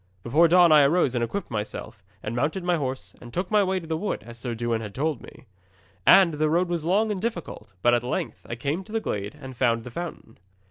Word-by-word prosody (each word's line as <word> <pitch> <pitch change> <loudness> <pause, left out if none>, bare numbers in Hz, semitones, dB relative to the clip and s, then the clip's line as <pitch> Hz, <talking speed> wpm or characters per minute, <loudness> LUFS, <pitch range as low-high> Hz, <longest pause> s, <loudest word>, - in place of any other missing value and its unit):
'Before 155 +8 +4
dawn 175 0 +6
I 150 -1 +8
arose 140 -2 +3
and 120 -2 0
equipped 195 +9 -4
myself, 110 0 -5 0.2
and 110 - -4
mounted 155 +9 -1
my 175 0 +2
horse, 135 -4 -4
and 120 - -11
took 180 - -3
my 210 -1 +4
way 190 0 0
to 165 - -10
the 160 0 -2
wood, 200 - -3
as 120 0 -9
Sir 120 -1 -3
Dewin 115 -1 -1
had 105 -3 -8
told 145 -2 -1
me. - - -14 0.6
And 185 -4 +7
the 155 +1 +1
road 175 +3 +1
was 170 -3 -2
long 205 +6 +2
and 195 -3 -3
difficult; 170 - -5
but 120 - +5
at 120 - +3
length 125 - -3
I 115 - -3
came 145 +9 -2
to 215 - -14
the 225 - 0
glade 105 - -4
and 130 -3 -9
found 115 -2 +1
the 125 - -9
fountain. 160 -7 -7
150 Hz, 240 wpm, -25 LUFS, 120-175 Hz, 0.6 s, I